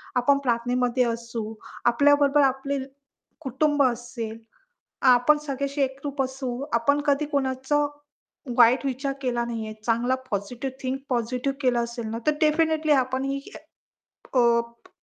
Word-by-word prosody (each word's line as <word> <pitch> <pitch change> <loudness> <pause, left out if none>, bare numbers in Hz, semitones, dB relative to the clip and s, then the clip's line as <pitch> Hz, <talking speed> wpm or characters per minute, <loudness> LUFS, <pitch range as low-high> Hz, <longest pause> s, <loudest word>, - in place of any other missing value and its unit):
आपण 255 +3 +4
प्रार्थनेमध्ये 245 +1 +1
असू, 230 -1 -5 0.4
आपल्याबरोबर 290 +2 +4
आपले 270 +1 -2 0.6
कुटुंब 290 +1 +1
असेल, 240 -2 -3 0.8
आपण 295 +5 +4
सगळ्याशी 280 +1 -2
एकरूप 275 +1 -2
असू, 260 0 -4 0.2
आपण 235 +5 +2
कधी 285 +1 +2
कोणाचा 270 +1 +1 0.7
वाईट 245 +3 +6
विचार 275 +1 -2
केला 240 -2 0
नाहीये, 225 -2 -4
चांगला 240 +2 +2 0.2
पॉझिटिव्ह, 240 +6 -3
थिंक 260 +1 -2
पॉझिटिव्ह 250 +2 -1
केलं 250 -3 +2
असेल 235 -1 -6
ना, 225 - -3
तर 305 - +4
डेफिनिटली 315 0 +2
आपण 260 0 +1
ही 275 0 -2 0.9
अ, - - +3
प 235 -1 +1
260 Hz, 125 wpm, -25 LUFS, 235-280 Hz, 0.9 s, वाईट